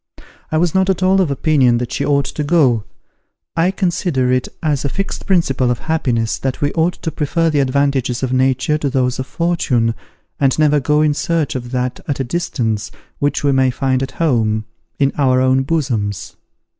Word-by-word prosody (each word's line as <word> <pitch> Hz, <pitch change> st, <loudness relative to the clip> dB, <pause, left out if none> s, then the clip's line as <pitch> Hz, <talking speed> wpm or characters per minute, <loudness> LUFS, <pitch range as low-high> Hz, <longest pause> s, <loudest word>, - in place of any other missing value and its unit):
I 155 Hz, -, +1 dB
was 170 Hz, 0 st, +1 dB
not 190 Hz, 0 st, +2 dB
at 185 Hz, -1 st, 0 dB
all 190 Hz, +1 st, +4 dB
of 175 Hz, -, +1 dB
opinion 135 Hz, -3 st, +2 dB
that 120 Hz, 0 st, -4 dB
she -, -, -2 dB
ought 140 Hz, -1 st, +2 dB
to 150 Hz, -, -4 dB
go. 140 Hz, -9 st, +2 dB, 0.7 s
I 170 Hz, +2 st, +2 dB
consider 175 Hz, -9 st, 0 dB
it 130 Hz, 0 st, +1 dB, 0.2 s
as 150 Hz, -3 st, 0 dB
a 140 Hz, -, -1 dB
fixed 195 Hz, +7 st, -4 dB
principle 150 Hz, -9 st, +2 dB
of 120 Hz, -, 0 dB
happiness, 125 Hz, -9 st, -1 dB
that 130 Hz, -1 st, -3 dB
we 145 Hz, 0 st, 0 dB
ought 170 Hz, +2 st, +1 dB
to 160 Hz, -, -2 dB
prefer 165 Hz, +2 st, 0 dB
the 145 Hz, -, +1 dB
advantages 135 Hz, -2 st, 0 dB
of 130 Hz, -1 st, -1 dB
nature 130 Hz, +3 st, +1 dB
to 145 Hz, -, -1 dB
those 130 Hz, -1 st, 0 dB
of 130 Hz, -, -4 dB
fortune, 130 Hz, -9 st, 0 dB, 0.5 s
and 135 Hz, -2 st, +2 dB
never 150 Hz, -1 st, +3 dB
go 150 Hz, +3 st, +2 dB
in 150 Hz, -1 st, +2 dB
search 160 Hz, 0 st, -1 dB
of 120 Hz, -2 st, -5 dB
that 125 Hz, 0 st, -2 dB
at 145 Hz, -, -2 dB
a -, -, +1 dB
distance, 120 Hz, -, -2 dB, 0.3 s
which 145 Hz, +1 st, 0 dB
we 140 Hz, -, +3 dB
may 130 Hz, -1 st, +3 dB
find 130 Hz, 0 st, 0 dB
at 135 Hz, 0 st, -4 dB
home, 110 Hz, -9 st, 0 dB, 0.3 s
in 140 Hz, -1 st, +1 dB
our 130 Hz, -2 st, +3 dB
own 130 Hz, +1 st, +3 dB
bosoms. 125 Hz, -, -2 dB
140 Hz, 195 wpm, -17 LUFS, 130-160 Hz, 0.7 s, all